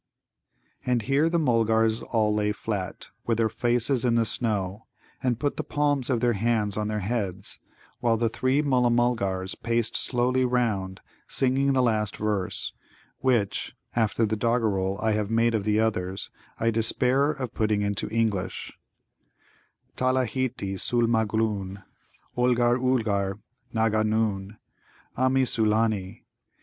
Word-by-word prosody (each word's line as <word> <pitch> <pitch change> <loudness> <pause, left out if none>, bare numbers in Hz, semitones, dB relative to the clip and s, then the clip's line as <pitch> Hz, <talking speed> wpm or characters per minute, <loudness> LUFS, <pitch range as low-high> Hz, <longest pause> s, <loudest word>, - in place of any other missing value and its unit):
And 125 -3 0
here 140 +6 +2
the 170 - +1
Mulgars 115 -5 +2
all 110 -2 0
lay 105 0 0
flat, 100 -4 -4 0.2
with 115 -2 +1
their 115 -1 +2
faces 120 +2 +1
in 120 -2 +2
the 115 -1 +3
snow, 105 -3 -1 0.3
and 125 -3 0
put 145 +2 -1
the - - -2
palms 145 -3 0
of 120 -4 +1
their 120 -1 +3
hands 105 -1 0
on 105 0 -1
their 105 -1 -2
heads; 95 -3 -3 0.4
while 115 -1 +2
the 115 +1 +1
three 130 +5 +1
Mulla 125 -4 +2
mulgars 105 -6 0
paced 115 -1 -1
slowly 125 +1 +1
round, 110 -7 -1 0.3
singing 135 +1 +3
the 130 -1 +3
last 110 -4 0
verse, 105 -3 -2 0.5
which, 120 -7 0 0.2
after 115 0 +2
the 110 0 -1
doggerel 105 -4 0
I 110 - +1
have 105 -1 -1
made 115 +1 +2
of 105 -3 -1
the 105 0 +2
others, 95 -4 -2 0.3
I 115 +1 +2
despair 125 +5 +2
of 130 -5 -4
putting 105 -2 0
into 100 0 -1
English: 105 -4 -2 1.2
"Talaheeti 130 -5 -1
sul 120 -1 +2
magloon 110 -4 -1 0.5
Olgar, 125 0 +2
ulgar 105 -7 0 0.3
Nanga 110 -2 +1
noon; 105 -2 -1 0.6
Ah 130 +1 +2
mi, 130 0 +2
Sulâni! 110 -4 0
115 Hz, 135 wpm, -26 LUFS, 105-125 Hz, 1.2 s, the